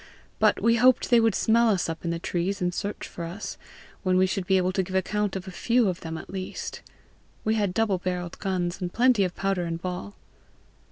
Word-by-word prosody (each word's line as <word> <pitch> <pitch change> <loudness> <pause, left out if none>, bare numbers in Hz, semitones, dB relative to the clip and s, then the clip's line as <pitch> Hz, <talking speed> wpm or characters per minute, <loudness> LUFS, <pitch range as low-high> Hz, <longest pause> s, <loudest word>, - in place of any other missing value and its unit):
But - - +4
we 230 0 +4
hoped 250 +2 +4
they 240 - +7
would 225 -3 +3
smell 230 +1 +4
us 195 -4 +1
up 165 0 -5
in 170 - -2
the 170 - -1
trees, 175 +3 -2
and 180 -1 0
search 205 +3 -4
for 170 - -7
us, 175 +6 -5 0.5
when 185 -1 +2
we 185 - +5
should 190 -1 -2
be 190 - +4
able 185 0 +1
to 190 - +1
give 185 +1 -5
account 205 +2 0
of 190 0 -5
a - - -5
few 235 +4 +2
of 180 -2 -1
them 165 0 -5
at - - -9
least: 190 -1 -5 0.6
we 220 - +2
had 205 -4 +1
double 200 -1 +1
barrelled 180 -1 -4
guns, 185 -1 -2
and 175 -1 -2
plenty 240 -2 +4
of 180 -1 -2
powder 195 -2 0
and 165 0 -3
ball." 180 - -5
190 Hz, 225 wpm, -26 LUFS, 180-210 Hz, 0.6 s, they